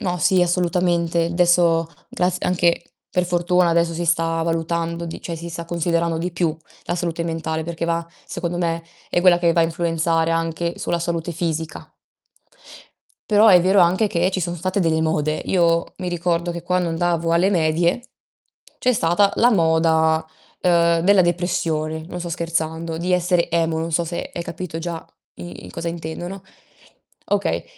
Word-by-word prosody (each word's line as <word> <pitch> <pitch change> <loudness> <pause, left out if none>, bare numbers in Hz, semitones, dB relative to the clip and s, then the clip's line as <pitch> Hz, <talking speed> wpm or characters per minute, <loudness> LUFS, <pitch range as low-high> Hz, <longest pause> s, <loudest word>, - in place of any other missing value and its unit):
No, 180 -4 -2
sì 180 +3 +3
assolutamente; 175 -1 +1
adesso 170 -2 +3 0.2
grazi 180 0 -1
anche 175 -1 +2 0.3
per 180 - +1
fortuna 175 0 +2
adesso 170 0 +2
si 170 +1 -3
sta 165 -1 +1
valutando 170 +1 -2
di 165 - -7
cioè 170 - -5
si 170 +1 -7
sta 170 0 -6
considerando 170 0 0
di 175 +2 -3
più 165 -2 -1 0.3
la 175 - -2
salute 170 -1 -2
mentale, 160 -1 -3
perché 170 0 -4
va 170 0 -1 0.2
secondo 175 0 -4
me 165 -1 -1 0.3
è 175 - +2
quella 180 -1 +5
che 170 -1 +2
va 170 - +2
a - - +4
influenzare 165 0 0
anche 165 +1 -2
sulla 170 - -1
salute 170 0 -3
fisica. 160 -1 -4 1.4
Però 210 +1 +5
è 180 -3 +7
vero 190 +3 +4
anche 185 +5 +3
che 180 0 +1
ci 190 0 -2
sono 175 0 -3
state 185 +4 -1
delle 160 -2 +1
mode. 155 -1 0
Io 170 -2 +1
mi 180 - -3
ricordo 175 0 -1
che 170 0 -6
quando 180 -1 0
andavo 165 0 0
alle 180 +4 +3
medie, 170 +6 +1 0.7
c'è 250 - +2
stata 200 0 +2
la 240 - +5
moda, 160 -3 +3 0.4
ehm, 170 -2 +3
della 200 -1 +5
depressione, 160 -3 -1
non 180 - -7
sto 175 0 -5
scherzando, 165 -1 -3
di 180 +2 -1
essere 180 -1 +2
emo, 165 -1 +1
non 165 +1 -3
so 170 +2 +1
se 170 +1 -5
hai 170 - -3
capito 170 -1 -6
già 165 0 -5 0.3
i 175 - -9
i - - -11
cosa 170 0 -4
intendo, 165 +1 -5
no. 195 0 -8 0.8
Okay, - - 0
170 Hz, 170 wpm, -21 LUFS, 165-175 Hz, 1.4 s, è